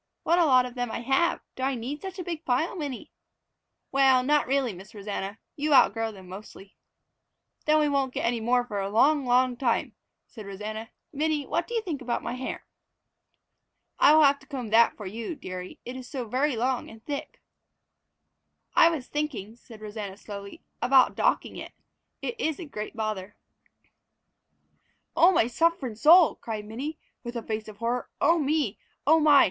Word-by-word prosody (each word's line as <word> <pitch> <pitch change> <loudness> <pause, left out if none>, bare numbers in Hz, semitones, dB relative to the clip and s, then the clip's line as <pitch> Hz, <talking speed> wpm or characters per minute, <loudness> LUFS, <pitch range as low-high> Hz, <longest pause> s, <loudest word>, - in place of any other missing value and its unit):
"What 340 +2 +3
a 340 - +5
lot 255 -2 +5
of 250 - -7
them 245 -1 -3
I 230 - -4
have! 270 +8 +1
Do - - -8
I 265 +1 0
need 255 +5 -5
such 385 0 -7
a 365 - -4
big 330 -2 -5
pile, 290 +5 0
Minnie?" 285 -8 -5 0.8
"Well, 265 -2 +4
not 295 +3 +2
really, 265 -4 +1
Miss 190 +4 -13
Rosanna. 200 0 -5 0.2
You 295 0 +2
outgrow 225 -3 +4
them 190 -3 -13
mostly." 195 +1 -11 0.9
"Then 305 0 +5
we 305 -1 +3
won't 275 -2 0
get - - -2
any 235 0 +1
more 245 +2 +2
for 210 -4 -4
a 195 0 -2
long, 275 +6 +3
long 250 0 +3
time," 240 -2 0 0.3
said 215 -4 -11
Rosanna. 215 +3 -6 0.2
"Minnie, 300 0 0
what 335 +5 -1
do 475 - -5
you 455 - 0
think 315 -9 -4
about 245 -1 -2
my 235 - -3
hair?" 255 +1 -5 1.3
"I 300 - +7
will 315 - +7
have 280 0 +5
to - - -20
comb 255 -7 -5
that 230 +1 +5
for 210 - -8
you, 225 - -5
dearie; 185 -7 -8
it 245 - -6
is 255 -1 -8
so 255 -5 -4
very 260 +4 +1
long 250 +2 -1
and 225 0 -14
thick." 285 -2 -5 1.3
"I 330 - +7
was 315 -7 -3
thinking," 260 -9 -4
said 230 -2 -15
Rosanna 210 -2 -6
slowly, 200 -1 -9 0.2
"about 255 +1 +5
docking - - 0
it. - - -8 0.5
It 470 - -4
is 315 -8 -1
a 350 - -7
great 215 -8 -7
bother." 215 -3 -4 1.8
"Oh, 350 - +6
my 295 - +3
sufferin' 265 -2 0
soul!" 320 - +7
cried 215 -2 -5
Minnie, 270 +9 -5 0.3
with 240 0 -6
a 235 - -3
face 215 0 -4
of 215 -1 -10
horror. 235 +2 -2
"Oh 335 +3 +4
me, 290 -7 0 0.3
oh 320 +3 +6
my! 295 -2 +6
250 Hz, 185 wpm, -27 LUFS, 220-295 Hz, 1.8 s, I